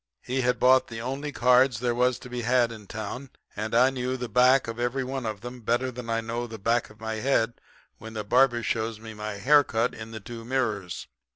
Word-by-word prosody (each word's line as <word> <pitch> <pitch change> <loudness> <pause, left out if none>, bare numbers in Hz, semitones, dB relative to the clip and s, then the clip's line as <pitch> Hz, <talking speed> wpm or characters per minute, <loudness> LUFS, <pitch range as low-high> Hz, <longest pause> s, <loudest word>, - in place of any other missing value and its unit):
He 130 +1 -1
had 125 0 +1
bought 130 +1 +5
the 115 -1 -7
only 135 +5 -4
cards 125 -2 +4
there 120 0 0
was 125 +1 +2
to - - -11
be 125 -1 -4
had 120 0 +2
in 110 -3 -10
town; 110 +6 -6 0.3
and 110 +2 -3
I 125 +3 +5
knew 130 0 -2
the 125 -1 -4
back 125 +2 +4
of 115 +1 -5
every 120 +2 0
one 130 -2 -4
of 105 -2 -4
them 120 0 -8
better 120 +3 0
than 120 -1 -8
I 115 0 0
know 115 +1 -3
the 110 -1 -8
back 115 +3 0
of 105 +1 -17
my 110 0 -4
head 120 -1 0 0.4
when 110 +1 -9
the 105 - -3
barber 120 +2 +3
shows 110 0 -2
me 110 0 -9
my 105 0 -5
haircut 125 0 +3
in 110 0 -8
the 110 -1 -7
two 115 +2 -9
mirrors. 110 -8 -2
120 Hz, 225 wpm, -26 LUFS, 110-125 Hz, 0.4 s, bought